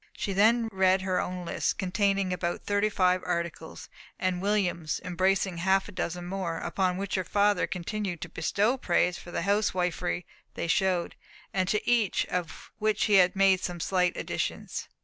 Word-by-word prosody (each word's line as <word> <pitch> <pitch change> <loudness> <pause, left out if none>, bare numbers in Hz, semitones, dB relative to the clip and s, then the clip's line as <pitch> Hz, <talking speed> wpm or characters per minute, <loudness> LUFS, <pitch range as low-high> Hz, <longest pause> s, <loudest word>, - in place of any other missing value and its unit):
She 200 - -2
then 225 +4 +4
read 190 -1 +3
her 185 -1 +1
own 180 -1 -5
list, - - -1
containing 195 0 +1
about 175 -1 -3
thirty 205 +1 +1
five 185 -2 +2
articles, 170 -2 -4 0.3
and 185 -1 -1
William's, 185 -6 0
embracing 185 0 +1
half 190 +2 +2
a - - -9
dozen 175 -1 -4
more; 180 -3 -3
upon 185 0 -1
which 195 0 -4
her 185 - +1
father 205 +1 +2
continued 185 0 -4
to - - -5
bestow 205 +9 +1
praise 180 -5 +1
for - - -12
the 170 - -3
house 205 +3 +2
wifery 180 -1 -1 0.3
they - - -3
showed, 180 0 +1 0.4
and 185 -1 0
to 210 - 0
each 235 -5 +2
of 175 -3 -4
which 215 -1 +1
he 200 -4 +6
made 195 -1 +4
some 175 -1 -3
slight 180 +1 +1
additions. - - -3
185 Hz, 170 wpm, -28 LUFS, 180-200 Hz, 0.4 s, he